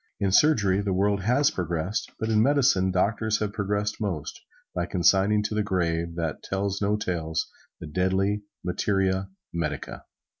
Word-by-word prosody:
In 100 -1 +1
surgery 100 -7 +4
the 100 -2 -1
world 100 +1 +1
has 130 +9 +3
progressed, 85 +3 -2
but 110 - -2
in 110 -1 +3
medicine, 130 -8 +3
doctors 105 +4 +1
have 105 -1 -3
progressed 105 0 -2
most, 90 -8 -3 0.3
by 85 0 -2
consigning 95 +4 +3
to 105 - -2
the 105 - +1
grave, 85 -4 -1
that 80 -3 -3
tells 100 +1 -2
no 105 +1 +2
tales, 80 -6 -2 0.3
the - - -7
deadly 95 +5 0 0.2
materia 95 +1 0 0.2
medica. 75 -4 -4
95 Hz, 150 wpm, -26 LUFS, 90-105 Hz, 0.3 s, surgery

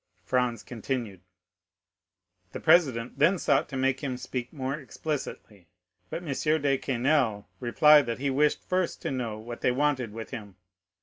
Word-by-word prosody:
Franz 125 -2 0
continued: 115 -5 -4 1.3
"'The - - -4
president 135 -7 +3
then 170 +7 +4
sought 140 -4 +1
to 135 - -4
make 130 0 +1
him 130 -3 -3
speak 125 -1 -5
more 135 -3 -3
explicitly, 140 - -6 0.4
but 170 - -5
M. 155 +2 +1
de 140 -1 +2
Quesnel 125 -5 +1
replied 145 +3 +5
that 115 - -2
he 140 +1 -1
wished 150 +3 +2
first 185 -1 -1
to - - -2
know 120 -5 -3
what 120 +2 -8
they - - +3
wanted 130 -3 0
with 110 +1 -8
him. 105 -7 -8
130 Hz, 150 wpm, -28 LUFS, 120-145 Hz, 1.3 s, replied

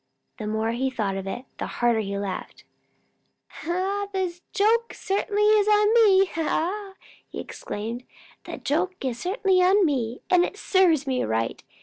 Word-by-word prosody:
The 215 - -4
more 220 +1 -1
he 260 +3 -1
thought 215 -7 -2
of 195 0 -5
it, 245 +7 -5
the - - -3
harder 240 -2 +1
he 200 -2 -3
laughed. 195 -2 -5 1.0
"The 375 +1 -2
joke 455 +3 +2
certainly 410 +1 -1
is 420 -1 +4
on 420 +1 +4
me!" 390 -2 +2 0.4
he - - -7
exclaimed. 230 +4 -6 0.4
"The - - -6
joke 355 +6 -1 0.2
certainly 375 - +1
is 360 - +5
on 390 +1 +4
me, 250 -6 -1
and 360 -1 +4
it 400 - -4
served 355 -9 +3
me 260 -2 0
right. 115 +1 -2
350 Hz, 145 wpm, -25 LUFS, -, 1.0 s, is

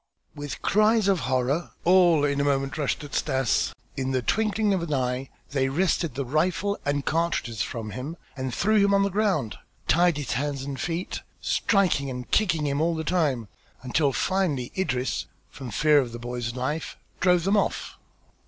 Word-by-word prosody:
X - - -36
With 145 -1 -6
cries 215 0 +3
of 195 -3 +3
horror, 130 +6 0
all 175 -4 +5
in 140 0 +1
a - - +1
moment 135 -1 0
rushed 150 -1 -1
at 145 - -10
Stas; 130 -5 +1 0.2
in 130 -1 -2
the 130 -1 0
twinkling 215 - +1
of 185 - 0
an 155 -3 -1
eye 125 0 -1 0.2
they 135 -2 +1
wrested 170 -2 0
the 140 0 -2
rifle 175 +8 0
and 145 -1 0
cartridges 155 - -1
from 110 -3 -4
him 130 - -6 0.2
and 130 -2 -3
threw 210 - +3
him 200 0 +4
on 195 - +4
the 200 - 0
ground, 190 - 0 0.3
tied 175 -1 +4
his 145 -3 -4
hands 140 +1 -2
and 135 -1 -5
feet, 170 +5 -3 0.2
striking 180 -9 +1
and 125 -1 -6
kicking 165 -8 +2
him 140 +1 0
all 165 +1 +1
the 160 - -3
time, 150 - 0 0.4
until 140 +3 +1
finally 155 -8 0
Idris, 130 -9 -1 0.2
from 130 -3 -8
fear 150 +5 +4
of 125 -4 -2
the - - -5
boy's 120 0 -4
life, 140 +5 -3 0.2
drove 180 -2 +3
them 195 +4 +2
off. 205 - -1
145 Hz, 180 wpm, -26 LUFS, 130-180 Hz, 0.4 s, all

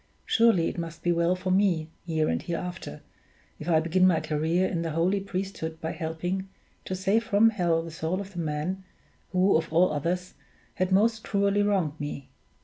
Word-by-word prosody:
Surely 225 -8 +4
it - - -4
must 165 -1 -6
be 175 - +2
well 170 +1 +2
for 185 0 -3
me, 180 -5 +2 0.2
here 160 -2 +1
and 80 - 0
hereafter, 175 - -5 0.6
if 155 - -5
I 160 -2 +5
begin 175 +3 +3
my 170 -3 +3
career 160 +5 0
in 170 - -2
the 165 - -2
holy 170 +5 +1
priesthood 185 -4 -4
by 160 - -3
helping 175 +4 -3 0.4
to 185 - -3
save 195 +4 +1
from 225 0 +4
hell 170 -5 +1
the 165 - -8
soul 165 +3 -2
of 200 0 -7
the 175 - -5
man 160 +4 -2 0.5
who, 185 +2 +3
of 160 0 0
all 170 +2 +4
others, 180 +5 -2 0.4
has 185 0 0
most 220 +3 +3
cruelly 200 0 +1
wronged 185 -7 0
me. 145 -2 -5
180 Hz, 185 wpm, -27 LUFS, 160-190 Hz, 0.6 s, I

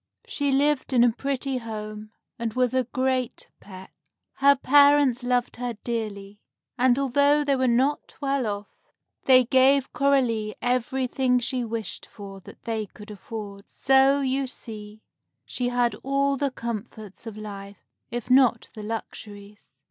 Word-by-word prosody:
She 285 -1 -1
lived 280 0 +1
in 240 -2 +5
a 240 - +5
pretty 270 +1 -3
home, 215 -2 -7 0.3
and 230 -2 -3
was 250 -1 +1
a 260 -1 +1
great 255 -1 -2
pet. 190 -1 -12 0.5
Her 280 +1 +5
parents 285 -2 +4
loved 245 -1 0
her 245 -1 -4
dearly, 210 -4 -5 0.4
and 255 -1 +3
although 285 +2 +3
they 280 -1 +1
were 260 -1 +1
not 260 +5 0
well 275 -4 -1
off, 205 0 -4 0.6
they 255 -1 +7
gave 265 +2 +3
Coralie 245 -6 +1
everything 250 +1 0
she 250 +1 -1
wished 225 -1 -5
for 195 -2 -10
that 185 - -15
they 220 -2 -3
could 210 +2 -13
afford. 205 -1 -8
So, 270 +1 +3
you 270 0 0
see, 215 -4 -10 0.4
she 245 -1 -2
had 245 -1 +1
all 275 +1 +1
the 280 +1 -1
comforts 225 -3 -7
of 215 -2 -7
life, 200 -2 -9 0.2
if 240 -1 -5
not 255 -3 +4
the 215 - -8
luxuries. 210 -4 -8
245 Hz, 145 wpm, -25 LUFS, 215-270 Hz, 0.6 s, they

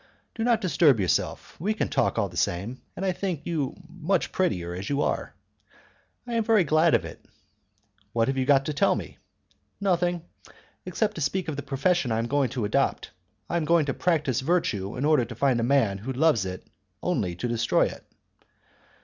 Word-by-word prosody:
"Do 225 - -3
not 230 -2 +3
disturb 165 - +4
yourself; 95 -3 -1
we 210 +7 0
can - - 0
talk - - 0
all 110 -3 +1
the 90 - -13
same, 95 +9 -2
and 195 - -3
I 190 - +2
think 180 -4 -3
you 150 -6 -2
much 175 +2 -1
prettier 90 - -1
as 95 +3 -5
you 145 0 +1
are." - - -2 0.9
"I 240 - -5
am 230 -1 +2
very 215 -3 +4
glad 155 +1 +4
of - - 0
it." - - -10 0.9
"What 115 0 +1
have 135 - 0
you 130 - +1
got 140 -1 +4
to 150 - -2
tell 195 +7 +3
me?" - - -7 0.6
"Nothing, 175 -3 +1 0.6
except 205 +4 0
to - - -4
speak 170 +6 -1
of 150 - -3
the 145 - -4
profession 145 0 0
I 110 - +1
am 115 - 0
going 140 +1 +1
to 120 -3 -2
adopt. 105 - 0 0.4
I 170 - -1
am 165 - -1
going 170 -1 +3
to 135 - -1
practice 150 -8 +1
virtue 130 - -1
in 135 - -1
order 150 -5 +4
to 115 0 -7
find 130 0 +2
a - - 0
man 115 -6 +2
who 120 +7 -5
loves 130 -7 +2
it 90 0 -7 0.4
only 110 - -1
to 120 - -3
destroy 115 -1 +2
it." - - -6
145 Hz, 200 wpm, -26 LUFS, 115-175 Hz, 0.9 s, disturb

